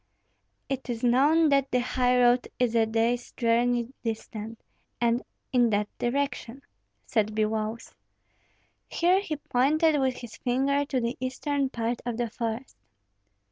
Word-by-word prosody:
"It 270 -2 -4
is 235 -1 -3
known 290 +7 +4
that 275 -1 +2
the 250 - +1
highroad 250 0 +3
is 245 -2 +1
a 225 -1 +3
day's 230 +2 0
journey 240 +1 +1
distant, 225 -1 -5 0.4
and 235 +1 +2 0.3
in 245 -2 +4
that 210 -1 -1
direction," 270 0 -2 0.4
said 215 -2 0
Biloüs. 220 +1 -2 1.0
Here 360 +3 +3
he 315 -6 -3
pointed 295 +3 +2
with 260 -1 +1
his 240 -2 -10
finger 275 +3 +1
to 275 -2 -1
the 235 +1 -2
eastern 270 +2 -1
part 235 -1 -2
of 240 -2 -3
the 240 -2 -2
forest. 230 +3 -4
245 Hz, 135 wpm, -27 LUFS, 230-270 Hz, 1.0 s, known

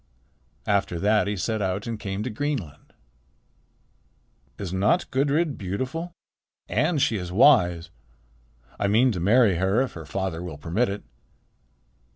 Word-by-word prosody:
After 100 -4 0
that 105 +3 +2
he 105 0 -2
set 110 +3 -2
out 95 +1 -2
and 115 -2 -4
came 100 0 -4
to 125 - -3
Greenland. 110 - -4 1.7
"Is 95 -3 -5
not 95 +3 +2
Gudrid 145 +3 +1
beautiful? 130 - -4 0.6
And 155 +7 +1
she 130 -5 +2
is 90 -2 -5
wise. 90 - +4 0.9
I 100 - +1
mean 115 +6 +4
to 95 - -3
marry 105 +1 +4
her, 95 +5 +2
if 135 - -5
her 80 -3 -9
father 90 0 -3
will 90 -5 -7
permit 90 +11 0
it." 100 +1 -5
100 Hz, 140 wpm, -25 LUFS, 90-125 Hz, 1.7 s, wise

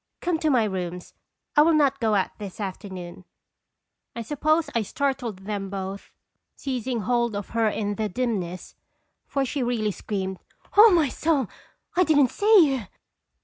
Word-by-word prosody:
Come 345 -3 -1
to 315 - +1
my 250 -5 +4
rooms 180 -3 -4 0.4
I 295 - +7
will 320 +1 +5
not 275 -2 +3
go 220 -3 +2
out 195 - +1
this 200 -1 -8
afternoon." 185 -3 -6 0.9
I 235 - -4
suppose 310 +5 +1
1 230 - +1
startled 240 -7 -2
them 200 -2 -3
both, 195 0 -6 0.5
seizing 255 -3 -3
hold 235 +1 0
of 205 -1 -5
her 230 -1 +1
in 205 -1 -2
the 215 +1 -2
dimness, 190 -6 -3 0.5
for 275 -1 0
she 270 +2 -3
really 235 -4 0
screamed: 190 -2 -4 0.4
"O 430 +3 +9
my 335 -6 +4
soul! 295 -1 +1 0.5
I 365 - +5
didn't 290 -6 +4
see 405 -8 +5
you!" 230 -7 -6
230 Hz, 155 wpm, -25 LUFS, 200-285 Hz, 0.9 s, O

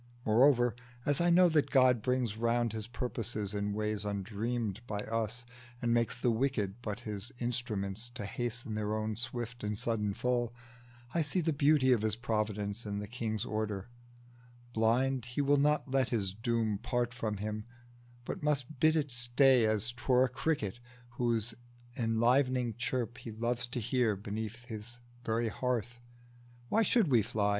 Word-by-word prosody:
Moreover, 120 +1 +5 0.3
as 145 +2 +2
I 175 - +4
know 180 +1 +7
that 155 -3 +2
God 130 -3 +5
brings 125 -3 0
round 115 0 +1
His 110 -1 -4
purposes 115 -4 -2
in 105 0 -1
ways 105 0 -1
undreamed 105 +2 -2
by 105 -1 -2
us, 115 +2 -3 0.3
And 120 -1 +1
makes 120 +1 +1
the 120 - +2
wicked 110 -3 -1
but 105 0 -4
his 105 -1 -4
instruments 115 -3 -2
To 105 - -4
hasten 120 +1 -3
on 110 +1 -1
their - - -6
swift 120 +1 -5
and 105 0 -2
sudden 105 -3 -1
fall, 120 -1 0 0.6
I 170 - +2
see 155 +4 0
the 165 -2 +1
beauty 140 -2 +4
of 120 -4 +4
his 110 -1 +1
providence 105 -1 -2
In 100 -1 -3
the 105 0 -4
King's 110 -2 -3
order: 105 -1 -3 0.8
blind, 125 +3 +2
he 125 +3 -2
will 145 +1 +4
not 145 -1 +2
let 130 -2 +2
His 100 -6 -1
doom 110 -1 0
part 120 0 -1
from 110 -3 -2
him, 105 +1 -4 0.6
but - - -4
must 150 -2 -1
bid 155 +2 +5
it 145 -3 0
stay 125 0 +4
As 110 +2 +1
't 120 +1 -15
were 130 -1 +5
a - - -2
cricket, 125 -6 -1 0.3
whose 120 -1 0 0.4
enlivening 120 +1 +2
chirp 120 0 -2
He - - -8
loved 120 +2 -2
to - - 0
hear 120 -1 +1
beneath 110 +4 -5
his 115 0 -7 0.3
very 115 0 0
hearth. 120 0 -2 0.7
Why 225 - +3
should 225 - +3
we 120 -4 +5
fly? 105 -1 0
120 Hz, 165 wpm, -32 LUFS, 110-125 Hz, 0.8 s, know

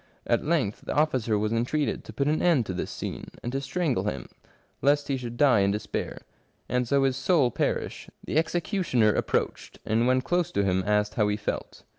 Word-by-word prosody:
At - - +1
length 145 -11 0
the - - -2
officer 130 -8 +2
was 105 +2 0
entreated 130 +6 0
to - - -8
put 140 - -1
an 155 +1 +1
end 160 -10 +3
to 95 - -4
this 90 - -3
scene, - - -6 0.2
and 120 - -3
to 135 +1 -2
strangle 140 - -1
him, 70 - -3 0.5
lest 145 0 +2
he 135 - +1
should 120 -2 -6
die 135 -6 +5
in 100 0 +3
despair, 105 +2 -3 0.5
and 125 0 0
so 140 +2 +3
his 135 -1 +2
soul 135 -2 +2
perish. - - -2 0.2
The - - -1
executioner 165 - +1
approached, - - -2
and 115 +3 +2
when 130 0 +3
close 175 +4 0
to 100 - +2
him 95 -1 +1
asked 105 0 +2
how 105 -2 +2
he 105 0 0
felt. 105 - -5
125 Hz, 200 wpm, -27 LUFS, 105-150 Hz, 0.5 s, die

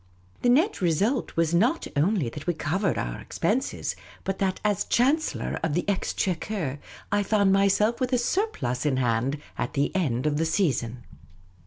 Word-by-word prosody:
The 245 - +3
net 315 - +3
re 175 -2 +3
sult 215 - 0
was 165 0 +2
not 235 - +2
only 165 - +2
that 150 +7 -9
we 175 - +1
covered 170 +5 0
our - - -3
expenses, - - -1 0.3
but 195 0 -3
that, 190 -1 0
as 205 -3 +2
chancellor 285 +6 +1
of 160 -2 -1
the 175 - -1
exchequer, 185 -5 -1 0.3
I 205 0 +3
found 200 -1 +3
myself 200 +4 +3
with 255 -1 -1
a 250 - +3
surplus 240 - -1
in 145 -4 +1
hand 125 +3 0 0.2
at - - -2
the 145 +4 0
end 135 -8 0
of 150 -1 +1
the 165 - +1
season. 125 - 0
185 Hz, 170 wpm, -26 LUFS, 145-215 Hz, 0.3 s, The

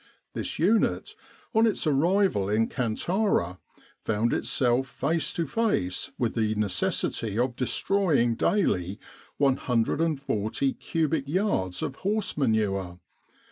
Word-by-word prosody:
This - - -4
unit, 205 +8 +1 0.4
on 225 0 +4
its 215 - -1
arrival 155 - +2
in 110 +2 +2
Kantara, 125 - 0 0.4
found 110 +2 0
itself 125 +1 +1
face 145 +3 -1
to 170 - -1
face 145 - -1
with 120 -3 0
the 110 -2 0
necessity 105 +1 -1
of 125 0 0
destroying 140 -1 +1
daily 100 - 0 0.4
140 135 -2 0
cubic 155 -3 -1
yards 145 - 0
of 135 - -4
horse 210 +1 -1
manure. 100 -9 0
130 Hz, 105 wpm, -27 LUFS, 110-165 Hz, 0.4 s, on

